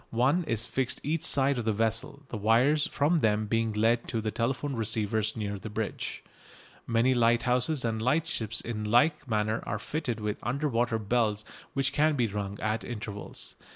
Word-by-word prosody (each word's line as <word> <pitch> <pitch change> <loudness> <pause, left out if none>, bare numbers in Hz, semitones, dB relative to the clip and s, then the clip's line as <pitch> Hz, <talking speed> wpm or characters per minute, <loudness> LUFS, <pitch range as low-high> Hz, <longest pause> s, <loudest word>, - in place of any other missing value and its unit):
One 130 +10 +2
is 115 -6 -1
fixed 130 -1 -1
each 155 +2 -1
side 135 -1 +2
of 115 - -4
the 110 - +2
vessel, 130 +7 -1
the 110 - -4
wires 120 +8 +3
from 155 +4 +2
them 110 -3 +2
being 115 +1 0
led 115 +2 +2
to 115 - -1
telephone 130 +5 -1
receivers 110 -1 0
near 100 -2 -3
the 110 - -7
bridge. 110 0 -3 0.6
Many 115 +3 +3
lighthouses 125 +4 +2
and 110 -1 -1
lightships 120 -4 0
in 110 -2 -4
like 140 +8 +3
manner 110 +1 0
are - - -3
fitted 130 -7 -3
with 105 -1 -3
under 140 +6 -1
water 120 -3 +1
bells 110 -1 0 0.3
which 135 0 +1
can 150 +1 +3
be 125 -4 +2
rung 100 -1 -4
at 110 +1 -1
intervals. 105 -3 -6
115 Hz, 170 wpm, -29 LUFS, 110-130 Hz, 0.6 s, wires